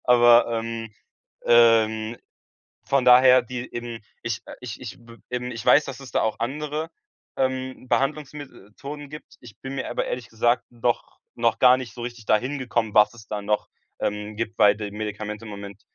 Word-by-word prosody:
Aber, 120 Hz, -1 st, +6 dB
ähm, 115 Hz, -1 st, -5 dB, 0.6 s
ähm, 115 Hz, -1 st, +4 dB, 0.7 s
von 135 Hz, -2 st, +1 dB
daher, 125 Hz, +1 st, +7 dB
die 125 Hz, +1 st, -7 dB
eben 120 Hz, -1 st, -5 dB, 0.2 s
ich, 115 Hz, -4 st, -3 dB
äh, -, -, -10 dB
ich 125 Hz, -3 st, -7 dB
ich 125 Hz, -, -8 dB
b 115 Hz, 0 st, -15 dB
eben, 125 Hz, 0 st, -3 dB
ich 115 Hz, -2 st, -7 dB
weiß, 150 Hz, -, +6 dB
dass 135 Hz, 0 st, -7 dB
es 130 Hz, -3 st, -11 dB
da -, -, +1 dB
auch 110 Hz, -, -1 dB
andere, 150 Hz, +5 st, -3 dB, 0.5 s
ähm, 130 Hz, -1 st, -2 dB
Behandlungsmethoden 145 Hz, -1 st, -4 dB
gibt. 150 Hz, +1 st, -12 dB
Ich 115 Hz, -4 st, -14 dB
bin 135 Hz, 0 st, -7 dB
mir -, -, -4 dB
aber -, -, -2 dB
ehrlich 120 Hz, -2 st, -5 dB
gesagt 120 Hz, +2 st, +1 dB
noch 120 Hz, 0 st, -2 dB, 0.2 s
noch 115 Hz, -1 st, +1 dB
gar 125 Hz, 0 st, +7 dB
nicht 125 Hz, -4 st, -7 dB
so 120 Hz, -, -8 dB
richtig 120 Hz, -2 st, -7 dB
da 110 Hz, -, +4 dB
hingekommen, 125 Hz, -3 st, -2 dB
was 105 Hz, +2 st, +5 dB
es 110 Hz, -2 st, -14 dB
da 105 Hz, -1 st, -4 dB
noch, 105 Hz, +1 st, -1 dB, 0.3 s
ähm, 105 Hz, +1 st, -3 dB
gibt, 110 Hz, +1 st, -4 dB
weil 105 Hz, -1 st, +6 dB
die 105 Hz, -1 st, -6 dB
Medikamente 105 Hz, +1 st, -5 dB
im 110 Hz, -, -8 dB
Moment 100 Hz, 0 st, -9 dB
120 Hz, 180 wpm, -24 LUFS, 110-130 Hz, 0.7 s, daher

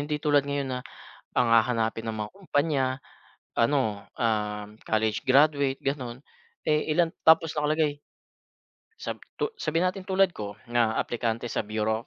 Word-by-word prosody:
hindi 150 Hz, +1 st, -1 dB
tulad 145 Hz, -1 st, +2 dB
ngayon 140 Hz, -1 st, -1 dB
na 125 Hz, -, -2 dB, 0.6 s
ang 125 Hz, -, +3 dB
hahanapin 115 Hz, -1 st, +2 dB
ng 110 Hz, -, -2 dB
mga 105 Hz, -1 st, -4 dB
kumpanya 150 Hz, -6 st, 0 dB, 0.8 s
ano 115 Hz, -5 st, +1 dB
ah, 105 Hz, -3 st, -1 dB, 0.2 s
college 110 Hz, -1 st, +1 dB
graduate 140 Hz, 0 st, +4 dB
ganon. 130 Hz, -2 st, -3 dB, 0.4 s
Eh 150 Hz, 0 st, +1 dB
ilan 170 Hz, -2 st, +3 dB, 0.2 s
tapos 160 Hz, 0 st, +6 dB
nakalagay. 150 Hz, -1 st, 0 dB, 1.0 s
Sab -, -, -4 dB, 0.2 s
tu 445 Hz, -, 0 dB
sabihin 165 Hz, +2 st, 0 dB
natin 190 Hz, 0 st, -10 dB
tulad 190 Hz, 0 st, +3 dB
ko 105 Hz, -9 st, -6 dB, 0.2 s
na 115 Hz, -2 st, +2 dB
aplikante 115 Hz, 0 st, -2 dB
sa -, -, -2 dB
bureau 110 Hz, +1 st, -1 dB
130 Hz, 140 wpm, -27 LUFS, 110-150 Hz, 1.0 s, tapos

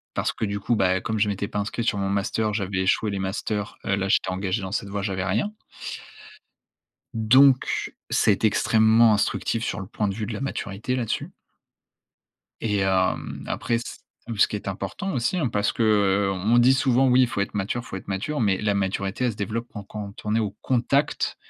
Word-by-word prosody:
Parce -, -, 0 dB
que 110 Hz, -, -3 dB
du 100 Hz, 0 st, -3 dB
coup, 120 Hz, -, 0 dB
bah, 95 Hz, -2 st, +2 dB
comme 110 Hz, +2 st, -2 dB
je 105 Hz, 0 st, +2 dB
m'étais 100 Hz, 0 st, -2 dB
pas 105 Hz, -, -5 dB
inscrit 105 Hz, +3 st, -2 dB
sur 115 Hz, -2 st, 0 dB
Mon 95 Hz, -1 st, -1 dB
Master, 105 Hz, +2 st, 0 dB
j'avais 100 Hz, -2 st, -2 dB
échoué 100 Hz, +3 st, +1 dB
les 100 Hz, -, -3 dB
masters. 100 Hz, +2 st, -3 dB
Heu, 100 Hz, -, +1 dB
là 95 Hz, 0 st, -1 dB
j'étais -, -, +2 dB
engagé 95 Hz, +2 st, -1 dB
dans 95 Hz, 0 st, -5 dB
cette 100 Hz, -, -2 dB
voie, 100 Hz, 0 st, -3 dB
j'avais 95 Hz, -2 st, -2 dB
rien. 110 Hz, -, 0 dB, 1.6 s
Donc, 130 Hz, +4 st, +4 dB, 0.2 s
ça 105 Hz, -, +3 dB
a -, -, +6 dB
été 110 Hz, -, +2 dB
extrêmement 110 Hz, +1 st, +4 dB
instructif 115 Hz, +2 st, 0 dB
sur -, -, -2 dB
le 95 Hz, -, -5 dB
point 105 Hz, +1 st, -2 dB
de 100 Hz, -, -2 dB
vue 110 Hz, -, -3 dB
de 115 Hz, -, -5 dB
la 105 Hz, -, -5 dB
maturité 125 Hz, -2 st, -3 dB
là-dessus. 120 Hz, -4 st, -3 dB, 1.3 s
Et 105 Hz, -3 st, 0 dB
hem, 95 Hz, -1 st, 0 dB
après 115 Hz, -, -1 dB
c -, -, -6 dB, 0.4 s
hem, 115 Hz, -, -5 dB
ce -, -, +5 dB
qui -, -, -4 dB
est 100 Hz, -, -6 dB
important 195 Hz, -, -4 dB
aussi, 125 Hz, +8 st, 0 dB
hein 160 Hz, -, +1 dB
parce 105 Hz, -2 st, +1 dB
que, 115 Hz, -, -1 dB
heu, 100 Hz, -2 st, +3 dB
on 100 Hz, +6 st, +2 dB
dit 120 Hz, +2 st, +6 dB
souvent: 130 Hz, -1 st, +3 dB
«Oui 125 Hz, +1 st, +5 dB
il 125 Hz, -, +4 dB
faut 100 Hz, -, -2 dB
être 100 Hz, -, -3 dB
mature, 105 Hz, +4 st, -2 dB
faut -, -, -7 dB
être -, -, -12 dB
mature», 100 Hz, +10 st, -2 dB
mais 100 Hz, -3 st, +2 dB
la 105 Hz, -1 st, +1 dB
maturité 100 Hz, +4 st, -1 dB
elle 120 Hz, -, +1 dB
se 105 Hz, -, -12 dB
développe 110 Hz, +4 st, -3 dB
quand 105 Hz, -2 st, -7 dB
quand 100 Hz, 0 st, -7 dB
on 105 Hz, -, 0 dB
est -, -, +3 dB
au 105 Hz, -3 st, -1 dB
contact 135 Hz, +3 st, +1 dB
105 Hz, 220 wpm, -24 LUFS, 100-115 Hz, 1.6 s, a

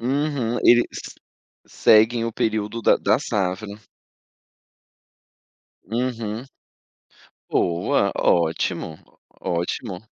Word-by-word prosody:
Uhum, 130 Hz, -2 st, -1 dB
eles 120 Hz, 0 st, +6 dB, 0.8 s
seguem 115 Hz, +2 st, +4 dB
o 115 Hz, -, -3 dB
período 110 Hz, 0 st, -2 dB
da -, -, +5 dB
da -, -, +2 dB
safra. 95 Hz, +1 st, -2 dB, 2.1 s
Uhum. 115 Hz, 0 st, -3 dB, 1.1 s
Boa, 85 Hz, 0 st, +1 dB
ótimo, 85 Hz, -1 st, 0 dB, 0.4 s
ótimo. 90 Hz, +3 st, -3 dB
110 Hz, 70 wpm, -22 LUFS, 95-120 Hz, 2.1 s, eles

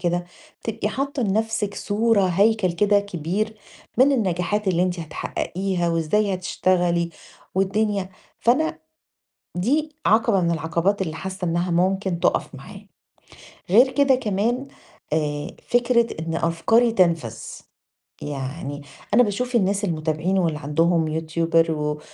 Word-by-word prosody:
كده 175 Hz, 0 st, 0 dB, 0.4 s
بتبقي 225 Hz, -2 st, -2 dB
حاطة 275 Hz, +4 st, -2 dB
لنفسِك 210 Hz, 0 st, -1 dB
صورة، 215 Hz, 0 st, +1 dB
هيكل 200 Hz, +1 st, +2 dB
كده 205 Hz, +3 st, +3 dB
كبير 200 Hz, +3 st, -3 dB, 0.4 s
من 275 Hz, +2 st, +6 dB
النجاحات 200 Hz, -2 st, 0 dB
اللي 175 Hz, -1 st, +2 dB
أنتِ 180 Hz, -1 st, -1 dB
هتحققيها، 175 Hz, +3 st, -3 dB
وإزاي 185 Hz, +5 st, +1 dB
هتشتغلي، 175 Hz, -2 st, 0 dB, 0.4 s
والدنيا 195 Hz, 0 st, 0 dB, 0.3 s
فأنا 315 Hz, +7 st, +2 dB, 0.8 s
دي 295 Hz, -, 0 dB
عقبة 220 Hz, -2 st, +4 dB
من 170 Hz, -, +1 dB
العقبات 170 Hz, +5 st, 0 dB
اللي 160 Hz, -3 st, -4 dB
حاسة 190 Hz, +1 st, -5 dB
إنها 175 Hz, +1 st, 0 dB
ممكن 185 Hz, 0 st, 0 dB
تُقف -, -, 0 dB
معايا، -, -, -11 dB, 0.8 s
غير 250 Hz, +6 st, +6 dB
كده 280 Hz, -2 st, +4 dB
كمان 235 Hz, +3 st, -1 dB, 0.5 s
آآ 150 Hz, -2 st, -1 dB, 0.2 s
فكرة 240 Hz, -1 st, +3 dB
إن 165 Hz, 0 st, -3 dB
أفكاري 225 Hz, +9 st, +2 dB
تنفذ، 165 Hz, -, +1 dB, 0.9 s
يعني 145 Hz, +1 st, -5 dB, 0.3 s
أنا 245 Hz, -, +7 dB
باشوف 245 Hz, +3 st, -2 dB
الناس 200 Hz, 0 st, +1 dB
المتابعين 160 Hz, +2 st, -1 dB
واللي 165 Hz, -4 st, 0 dB
عندهم 160 Hz, +3 st, +1 dB
يوتيوبر 165 Hz, +1 st, +1 dB
و 150 Hz, -1 st, -2 dB
185 Hz, 120 wpm, -23 LUFS, 165-215 Hz, 0.9 s, أنا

